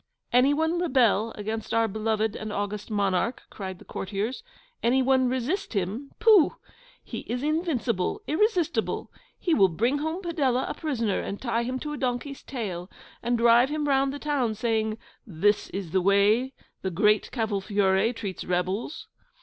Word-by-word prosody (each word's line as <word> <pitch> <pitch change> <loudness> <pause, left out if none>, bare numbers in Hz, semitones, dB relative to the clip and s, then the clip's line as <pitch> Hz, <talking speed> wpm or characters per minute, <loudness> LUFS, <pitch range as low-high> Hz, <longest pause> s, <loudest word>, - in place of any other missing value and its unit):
'Any 250 +3 +5
one 320 +3 +1
rebel 240 - +3
against 220 +2 -4
our 230 0 +3
beloved 220 0 -1
and 215 0 -5
august 205 +1 -3
Monarch!' 205 +3 0
cried 190 -2 -6
the - - -16
courtiers; 205 +5 -3 0.4
'any 260 +3 +3
one 260 -1 +3
resist 300 - -2
HIM? 210 +8 -2
Pooh! 435 -7 +5 0.5
He - - -6
is 245 +2 -3
invincible, 290 - -1
irresistible. 350 0 0 0.3
He 345 - 0
will 195 -10 +6
bring 235 - 0
home 315 +5 -3
Padella 275 -7 0
a - - -2
prisoner, 235 - -1
and 200 - -4
tie 235 -2 0
him 250 +2 -2
to 300 -1 -4
a - - -4
donkey's 260 +2 -3
tail, 190 -8 -5 0.3
and 240 0 +1
drive 235 +2 +5
him 300 0 -1
round 270 -1 +2
the 285 - -5
town, 280 -7 0
saying, 220 -1 0 0.3
"This 205 +3 +1
is 190 -4 -5
the 190 +1 +2
way 205 +7 +3 0.3
the 190 - -1
Great 210 +4 +2
Cavolfiore 205 -2 +1
treats 200 -5 -5
rebels." 185 - -2
235 Hz, 155 wpm, -26 LUFS, 205-275 Hz, 0.5 s, will